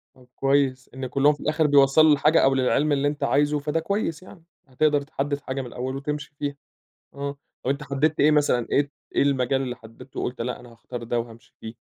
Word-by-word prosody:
طَب 125 -1 -20
كويّس 135 -1 +1
إن 130 0 -5
كلّهم 145 +3 +3
في - - -12
الآخر 155 0 +1
بيوصّلوا 145 +2 +5
للحاجة 150 +2 +4
أو 135 0 +4
للعلم 135 +3 +2
اللي 145 0 +2
أنت 145 0 -3
عايزه 145 +1 +2
فده 150 +3 -1
كويّس 175 -1 -2
يعني، 185 -2 -15 0.2
هتقدر 145 +2 +2
تحدّد 145 0 -3
حاجة 135 -1 -4
من 125 - -7
الأول 130 +2 -5
وتمشي 150 +1 -5
فيها، 145 -1 -3 0.6
آه 140 0 -4 0.3
أو - - +2
أنت 140 +2 -2
حدّدت 145 +2 0
إيه 150 +2 +6
مثلًا 145 -5 +2
إيه 140 0 +2 0.2
إيه - - +3
المجال 135 -1 +1
اللي 125 -2 -4
حدّدته 115 +2 -10
وقُلت 125 -1 -4
لأ 125 +1 -3
أنا 120 -1 -14
هاختار 120 +1 -8
ده 120 +1 -1
وهامشي 115 0 -11
فيه. 110 +1 -8
140 Hz, 205 wpm, -24 LUFS, 130-150 Hz, 0.6 s, إيه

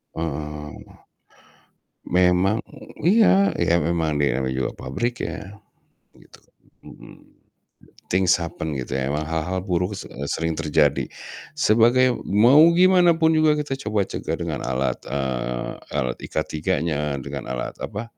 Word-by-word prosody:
Eee, 75 -1 -5 1.4
memang 90 +3 +3 0.5
iya, 200 0 +4
iya 85 - +3
memang 80 -2 0
dia 70 -1 +2
namanya 65 0 -2
juga 65 - -1
pabrik 120 - -4
ya. 100 +1 -8 0.6
Gitu, - - -19 0.4
mhm. - - -16 0.8
Things 90 -1 +4
happened 80 -2 -4
gitu 65 +2 -4
ya. 65 0 -1
Memang 75 +1 -1
hal-hal 80 +3 -2
buruk 90 +1 -1
se - - -8 0.2
sering 80 +2 -1
terjadi. 75 -2 +2 0.5
Sebagai 120 -1 +3
mau 120 +8 +5 0.2
gimanapun 175 -3 +5
juga 155 -1 +4
kita 150 -3 -3
coba 105 -1 +1
cegah - - -3
dengan - - -3
alat, 65 +1 -1
eee 65 -3 -3 0.2
alat 65 -4 -1
IK3-nya, 75 -2 -2
dengan - - -6
alat - - -5
apa, 110 +3 -6
85 Hz, 120 wpm, -23 LUFS, 75-115 Hz, 1.4 s, mau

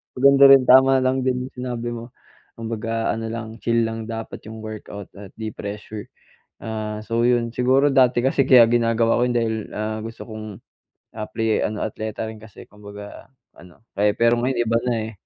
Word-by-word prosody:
Maganda 140 +1 +6
rin 135 -1 +7
tama 130 +1 +5
lang 130 +1 +1
din 130 0 -2
yung - - -46
sinabi 120 -1 -4
mo. 120 +1 -8 0.4
Kumbaga 115 0 -2
ano 115 +1 -4
lang, 115 0 -7
chill 115 -1 +1
lang 115 0 -5
dapat 115 -1 -6
yung 110 0 -9
workout 105 -2 -9
at 100 -1 -11
di 110 -1 -5
pressure. 105 +1 -7 0.5
Ah, 110 -1 -5
so, 115 +2 -1
'yon, 120 -1 +2
siguro 130 +4 +2
dati 130 -3 +3
kasi 135 +1 +2
kaya 130 -3 +7
ginagawa 115 -1 +2
ko - - +1
yun 125 - -1
dahil, 115 -2 0 0.2
ah, 110 +1 -3
gusto 115 +1 -9
kong, 110 0 -7 0.7
apply, 110 +1 -3
eh, - - +1
ano, 105 0 -4
atleta 110 0 -4
rin 110 - -9
kasi. 105 -1 -14
Kumbaga 105 +3 -12 0.3
ano, 90 +4 -17 0.2
kaya 105 0 +3
pero 115 +2 +2
ngayon 125 0 -1
iba 115 - +3
na, 125 - +1 0.2
eh. - - -10
115 Hz, 185 wpm, -22 LUFS, 110-125 Hz, 0.7 s, rin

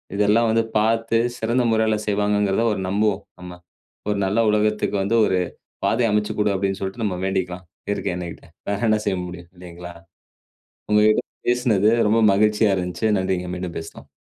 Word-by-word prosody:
இதெல்லாம் 105 +3 +3
வந்து 115 0 +2
பார்த்து 115 +1 +1 0.2
சிறந்த 120 +3 0
முறையில 110 -1 +2
செய்வாங்கங்கிறத 105 +1 +1
ஒரு - - -4
நம்புவோம் 105 +1 0 0.2
நம்ம. 90 0 -9 0.6
ஒரு 105 - 0
நல்ல 100 +4 0
உலகத்துக்கு 105 0 +1
வந்து 105 +4 0
ஒரு 95 - +1 0.5
பாதைய 115 0 +2
அமச்சிக் 105 0 0
கொடு 105 -1 +2
அப்பிடின்னு 95 0 -1
சொல்லிட்டு 95 +4 -4
நம்ம 95 -3 -2
வேண்டிக்கலாம். 95 -1 -2 0.2
இயற்கை 100 -3 -1
அன்னைக்கிட்ட. 85 -2 -7 0.2
வேற 100 0 -1
என்ன 110 0 +3
செய்ய 95 - +1
முடியும் 90 -1 -9
இல்லேங்களா? 85 -1 -10 1.0
உங்கக்கிட்ட 105 +3 +4 0.3
பேசினது 115 -5 +2 0.2
ரொம்ப 115 +1 +3
மகிழ்ச்சியா 105 0 +3
இருந்துச்சு. 90 +3 -2
நன்றிங்க. 95 -1 -2
மீண்டும் 90 -1 -5
பேசலாம். 80 - -11
105 Hz, 150 wpm, -22 LUFS, 95-110 Hz, 1.0 s, உங்கக்கிட்ட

